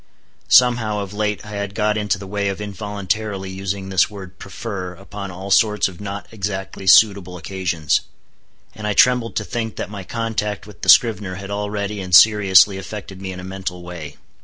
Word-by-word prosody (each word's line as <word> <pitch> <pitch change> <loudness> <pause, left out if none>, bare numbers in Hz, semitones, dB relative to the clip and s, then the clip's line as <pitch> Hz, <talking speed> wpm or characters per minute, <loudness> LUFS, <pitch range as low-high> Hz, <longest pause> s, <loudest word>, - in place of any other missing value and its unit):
Somehow, 120 -4 +4
of 100 -1 -5
late 105 0 -2
I 105 - -9
had 100 -1 -4
got 105 -1 +1
into 105 -2 0
the 100 - -9
way 100 +1 -2
of 95 - -4
involuntarily 100 -1 -3
using 95 0 -4
this 95 -1 +3
word 95 -3 -11
"prefer" 95 -2 -6
upon 100 +2 -8
all 95 +2 -7
sorts 105 0 +4
of 95 0 -11
not 100 0 -5
exactly 95 -2 -5
suitable 95 -2 +5
occasions. 90 -4 -1 0.7
And 105 -1 -6
I 105 - +1
trembled 125 -1 +3
to 105 - -1
think 110 +1 -4
that - - -5
my 100 -2 -7
contact 105 -1 -3
with 105 -4 -15
the - - -2
scrivener 105 -6 +5
had 100 +1 -8
already 105 0 -3
and 90 -2 +2
seriously 100 -2 +6
affected 95 -1 -8
me 95 -1 -5
in 90 - -8
a - - -8
mental 95 -1 -6
way. 85 -4 -8
100 Hz, 185 wpm, -20 LUFS, 95-105 Hz, 0.7 s, seriously